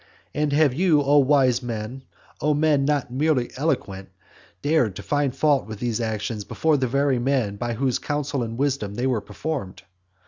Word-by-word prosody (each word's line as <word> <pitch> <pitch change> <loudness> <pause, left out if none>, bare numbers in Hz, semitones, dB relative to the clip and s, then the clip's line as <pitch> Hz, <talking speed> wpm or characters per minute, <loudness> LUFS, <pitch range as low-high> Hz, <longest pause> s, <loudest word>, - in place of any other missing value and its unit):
And 150 0 0
have 145 -2 +3
you, 155 -1 +3
O 145 +1 +5
wise 135 -3 +3
man, 120 +1 -5 0.4
O 150 +1 +2
man 145 -2 +2
not 145 -4 0
merely 135 -3 +1
eloquent, 100 -10 -2 0.5
dared 145 - +2
to - - -7
find 145 -3 0
fault 145 -6 +2
with 110 -1 -7
these 120 -2 -1
actions 110 -1 -3
before 155 +9 +1
the 130 -1 0
very 140 0 +1
men 120 -5 0
by 120 +2 -3
whose 130 +1 0
counsel 145 -2 -2
and 115 -1 -4
wisdom 130 -7 -1
they 125 - -2
were 125 -5 +1
performed? 115 -2 -5
135 Hz, 175 wpm, -23 LUFS, 115-145 Hz, 0.5 s, O